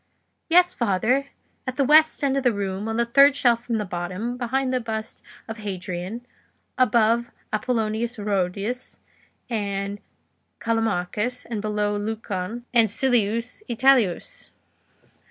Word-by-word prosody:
"Yes, 355 +2 +5
father; 235 +5 +1 0.4
at 255 - -2
the 275 - +2
west 310 +2 +5
end 275 -1 +2
of 275 - +1
the 250 -2 +3
room, 200 0 -3
on 225 0 -2
the 235 - +2
third 275 +4 +6
shelf 240 -4 +2
from 235 -2 -1
the 210 - -2
bottom, 185 +7 -4
behind 260 +2 -1
the 255 - +2
bust 220 -1 -5 0.3
of 225 0 -6
Hadrian, 190 +2 -5 0.5
above 235 -1 +3 0.2
Apollonius 225 +1 -1
Rhodius 205 +4 -2 0.5
and 200 -3 -3 0.6
Callimachus, 225 +1 -1
and 225 -3 -4
below 210 -1 -1
Lucan 215 +1 -4
and 230 -3 +5
Silius 235 - 0
Italicus." 250 - +2
225 Hz, 125 wpm, -24 LUFS, 205-250 Hz, 0.6 s, third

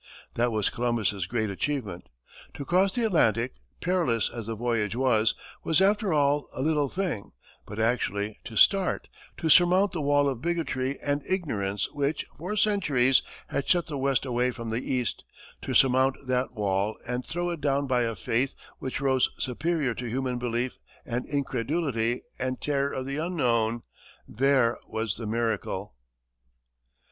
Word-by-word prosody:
That 120 +1 +1
was 105 -2 +1
Columbus's 110 -6 0
great 110 -1 -1
achievement. 105 -5 -3 0.5
To 140 - -6
cross 185 +4 +2
the 240 -2 +1
Atlantic, 125 - +2 0.3
perilous 165 -11 +1
as 115 -3 -6
the 115 - -3
voyage 115 -2 -1
was, 120 -4 +3 0.3
was 160 - +3
after 205 +1 +3
all 145 -1 +2
a 130 - -3
little 150 -2 +2
thing; 180 - -3 0.3
but 105 +1 -7
actually 110 -3 0
to 115 - -8
start 195 -2 +4 0.3
to 165 - -2
surmount 180 +4 +6
the 165 - -3
wall 145 0 +3
of 130 -4 -2
bigotry 145 -6 -1
and 145 0 0
ignorance 105 - -1
which, 145 +1 -1
for 180 +8 -4
centuries, 150 -13 +3 0.3
had 140 - -2
shut 175 -2 +4
the 150 -3 -5
west 135 0 +1
away 125 0 +1
from 115 -2 -5
the 115 +2 -1
east, 125 -3 -1 0.4
to - - -3
surmount 130 0 +4
that 130 0 0
wall 100 -1 0
and 125 +1 -2
throw 175 +4 -2
it 170 -3 -5
down 140 0 +1
by 125 -2 +2
a 115 -1 -1
faith 125 +6 -1 0.2
which 130 +1 -4
rose 130 -2 +3
superior 145 +1 -1
to 120 +1 -5
human 125 0 -1
belief 120 +1 -2 0.3
and 120 +1 -3
incredulity 135 -3 -1 0.2
and 130 0 -2
terror 140 -1 0
of 130 - -3
the 140 +1 -3
unknown 120 -9 +1 0.4
there 130 -1 +2
was 110 -2 -2
the 115 -1 -5
miracle! 110 - -2
130 Hz, 155 wpm, -27 LUFS, 115-150 Hz, 0.5 s, surmount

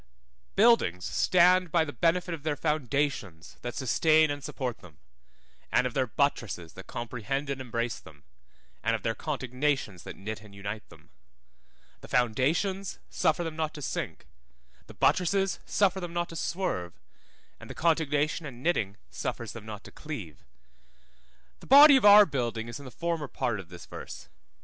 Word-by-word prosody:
BUILDINGS 200 - +4
stand 180 -1 +4
by 165 -1 +3
the 145 - -7
benefit 175 +1 +1
of 160 - -6
their 150 0 -1
foundations 140 - -2
that 120 -1 -5
sustain 155 +3 +3
and 145 -1 -5
support 125 -3 -4
them, 80 -5 -16 0.7
and - - +3
of 125 - -2
their 130 -2 +1
buttresses 115 - -1
that 95 - -11
comprehend 125 +4 -3
and 135 -1 -4
embrace 115 -2 -3
them, 75 -3 -16 0.6
and 115 0 +1
of 110 - -6
their 115 - 0
contignations 130 - -2
that - - -9
knit 105 +2 -6
and 105 -2 -15
unite 100 +2 -6
them. - - -18 0.9
The - - -12
foundations 155 - 0
suffer 175 - +1
them 165 -2 -5
not 155 -1 -2
to 150 - -7
sink, - - -4 0.6
the - - -13
buttresses 195 +2 +2
suffer 195 -2 +2
them 175 -2 -6
not 175 0 -1
to 165 - -9
swerve, 125 - -2 0.7
and - - -12
the - - -7
contignation 155 -1 +1
and 125 -2 -10
knitting 105 - 0
suffers 115 - -4
them 110 -2 -10
not 105 -1 -7
to - - -12
cleave. 105 - -8 1.2
The - - -14
body 285 +2 +10
of 260 - +3
our 205 0 +10
building 120 - -2
is 120 +4 -7
in 140 - -11
the - - -7
former 165 +1 -3
part 115 -4 -2
of 90 -3 -10
this 85 -1 -11
verse. 65 - -9
140 Hz, 165 wpm, -28 LUFS, 110-165 Hz, 1.2 s, body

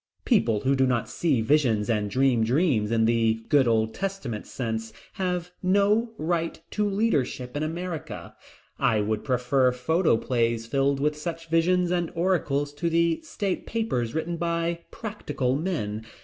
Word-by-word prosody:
People 115 - +2
who 135 - +2
do 130 -1 +3
not 120 -2 0
see 145 -9 0
visions 115 -5 +2
and 105 -3 0
dream 130 0 +2
dreams 120 - +2
in 115 -1 +2
the 115 -1 +1
good 140 -4 +4
Old 110 -1 +2
Testament 195 - -4
sense 115 -3 -4 0.2
have 180 -2 -2
no 205 +5 +2
right 165 +1 -1
to 210 -1 0
leadership 145 - 0
in 145 - -1
America. 165 +1 -5 0.4
I 110 - +3
would 105 +1 -1
prefer 125 0 +2
photoplays 125 -5 +1
filled 135 +3 +1
with 150 +2 +1
such 165 +1 -6
visions 175 +2 +3
and 175 -2 0
oracles 150 -5 0
to 170 +4 -1
the 170 0 +2
state 205 - -3
papers 155 - -1
written 170 +2 -2
by 170 0 -1
"practical 145 - -3
men." 115 - -3
145 Hz, 150 wpm, -26 LUFS, 115-175 Hz, 0.4 s, good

